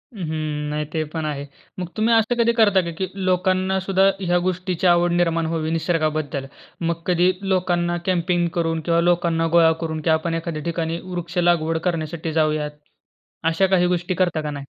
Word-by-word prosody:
हं, 200 - -8
हं. 155 -1 -3
नाही 150 0 -2
ते 160 -1 0
पण 160 -2 -2
आहे. 145 -2 -3 0.3
मग 180 - -3
तुम्ही 225 +2 +3
असं 225 +1 +3
कधी 235 0 +4
करता 205 -4 +5
का 170 -1 -4
की 190 - 0
लोकांनासुद्धा 190 0 +1 0.2
ह्या 175 -1 +2
गोष्टीची 185 0 -1
आवड 175 0 +4
निर्माण 165 -1 +1
व्हावी 160 -1 -2
निसर्गाबद्दल. 155 -4 -1 0.4
मग 170 0 -1
कधी 180 0 +3
लोकांना 175 -3 0
कॅम्पिंग 175 -1 +1
करून 165 -1 0
किंवा 170 0 +2
लोकांना 170 -1 +2
गोळा 165 -1 +6
करून 160 -1 -3
की 160 - -1
आपण 160 +1 +1
एखाद्या 165 -2 -4
ठिकाणी 165 0 -2
वृक्ष 175 -1 -6
लागवड 170 -2 +2
करण्यासाठी 160 -1 -4
जाऊयात. 155 -1 +1 0.8
अशा 165 +4 +3
काही 185 -2 +3
गोष्टी 175 0 -1
करता 175 -3 +1
का 150 -1 -4
नाही? 140 -1 -7
170 Hz, 175 wpm, -22 LUFS, 160-180 Hz, 0.8 s, गोळा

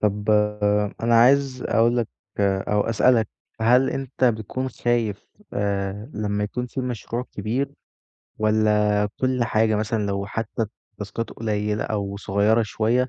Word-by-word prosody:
طَب 105 0 -1 0.7
أنا 115 0 +3
عايز 130 +1 +4
أقول 120 +2 +3
لك، 120 - 0 0.3
أو 100 +1 +1
أسألك، 115 0 +3 0.3
هل 125 +4 +4
أنت 130 -1 -2
بتكون 120 +3 0
خايف 120 -4 -1 0.3
آآ 100 +3 -2
لمّا 105 -1 -1
يكون 125 +4 -3
في 125 +2 -4
مشروع 120 -1 -3
كبير، 115 +7 -2 0.6
والاّ 105 -1 +2
كل 130 -2 +1
حاجة 110 -1 +2
مثلًا، 105 0 -1
لو 100 0 -2
حتي 115 +2 -3 0.3
التاسكات 105 +2 -5
قليلة 105 -1 -2
أو 100 -2 -2
صغيرة 105 +3 +2
شوية، 115 +4 +1
110 Hz, 130 wpm, -23 LUFS, 105-120 Hz, 0.7 s, عايز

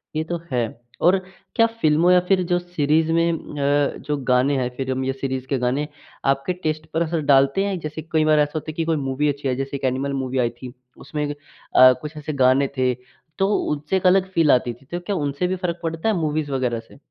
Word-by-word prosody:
ये 155 - 0
तो 170 +1 -4
है। 125 -2 +1 0.4
और 180 +3 +5 0.4
क्या 230 - +5 0.2
फ़िल्मों 160 +4 +4
या 180 - +7
फिर 190 -1 +3
जो 175 - +3
सीरीज़ 160 -2 +1
में 165 +1 +3
अ, 145 -2 0
जो 150 0 -3
गाने 130 +1 +2
हैं 125 -1 0
फ़िल्म 130 -1 -2
या 135 - 0
सीरीज़ 130 -1 -2
के 135 - 0
गाने, 130 +4 0 0.4
आपके 135 +5 +1
टेस्ट 155 -3 -3
पर 165 - +1
असर 165 -1 0
डालते 140 +8 +4
हैं, 195 -3 -2
जैसे 155 0 -6
कई 155 -1 +3
बार 155 -1 +4
ऐसा 145 0 +2
होता 155 0 -3
है - - -13
कि 165 +1 -2
कोई 165 0 +1
मूवी 145 +3 +1
अच्छी 140 0 -3
है, 130 - 0
जैसे 135 +2 -4
एक - - -15
एनिमल 135 +2 -1
मूवी 130 0 -3
आई 120 -1 +2
थी 125 -1 -8 0.2
उसमें 150 -1 -4 0.5
अ, 130 0 +9
कुछ 150 +1 -7
ऐसे 150 +1 -5
गाने 130 +2 +4
थे 130 -1 +2 0.4
तो 195 - +2 0.2
उनसे 150 +4 -2
एक 185 - -4
अलग 185 +1 +4
फ़ील 165 -5 +4
आती 125 -1 +2
थी 120 +4 -20
तो 175 - -2
क्या 195 +3 -3
उनसे 145 +2 -1
भी 185 - -1
फ़र्क 170 -1 -2
पड़ता 165 +5 -1
है 215 - +2
मूवीज़ 155 -3 -1
वग़ैरह 125 -3 -1
से? 115 - -16
150 Hz, 230 wpm, -22 LUFS, 135-165 Hz, 0.5 s, अ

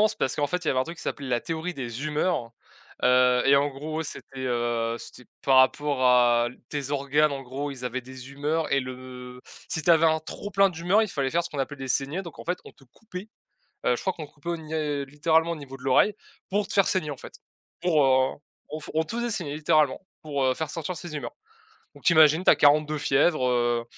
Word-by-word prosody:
Officieusement 215 - +5
c'est - - -6
parce 130 - 0
qu'en 145 - +1
fait 180 +3 -3
il - - 0
y - - +4
avait 130 - +1
un 130 - 0
truc 170 +1 -8
qui - - -8
s'appelait 140 -3 -4
la 120 -1 +1
théorie 165 +2 -4
des 125 -1 -5
humeurs, 150 -5 -1 0.5
heu, 125 0 +4
et 140 - +6
en 145 +1 +3
gros 155 +3 -4
c'était, 135 -3 -9
heu 120 -1 -1
c'était 125 - -11
par 135 -1 +4
rapport 140 +1 +2
à 120 -1 +5 0.2
tes 140 -2 -3
organes 145 +1 +2
en 135 -1 -5
gros. 135 +3 -5
Ils 130 -2 -8
avaient 125 +1 -2
des 130 +1 -11
humeurs 150 +3 -1
et 140 - +3
le 125 -1 -9 0.3
si 160 - -2
tu 170 - +3
avais 165 -1 +6
un 160 0 +3
trop 180 +6 -8
plein 195 0 +4
d'humeur, 175 +5 +2
il 220 - -1
fallait 135 -6 -1
faire 170 +3 +1
ce - - -6
qu'on 145 - -6
appelle 135 +1 -3
des 135 - -6
saignées, 140 +8 -1
donc 170 -5 -11
en - - -9
fait 180 +1 -2
on - - -12
te 135 - -22
coupait, 185 - -10 0.6
heu, 125 - +3
je - - -6
crois 190 - -1
qu'on 160 - -7
coupait 145 +3 -9
au 170 - -1
nié 155 -3 -3
littéralement 160 +4 +1
au - - -2
niveau 135 -3 -9
de 130 - -16
l'oreille, 140 +10 +3 0.3
pour 205 +1 0
te - - -6
faire 195 -2 +4
saigner, 155 -6 0
en 140 - -6
fait. - - -11 0.5
Pour, 160 -5 +3
heu 130 0 +3 0.3
on 155 +2 -5
f 150 - -10
on 160 - +3
te 210 - -7
faisait 240 0 -1
saigner 170 -9 -2
littéralement 155 -3 +2 0.2
pour, 145 -3 -2
heu, 130 - +3
faire 160 +1 -3
sortir 165 +2 -4
ces 170 -3 -7
humeurs, 150 - -6 0.6
donc 145 - -16
tu - - +5
imagines 160 +2 +6
tu - - +7
as - - +7
40 150 +1 +5
de 155 0 -3
fièvre, 145 -1 +2
heu 120 -1 +1
145 Hz, 250 wpm, -26 LUFS, 130-160 Hz, 0.6 s, tu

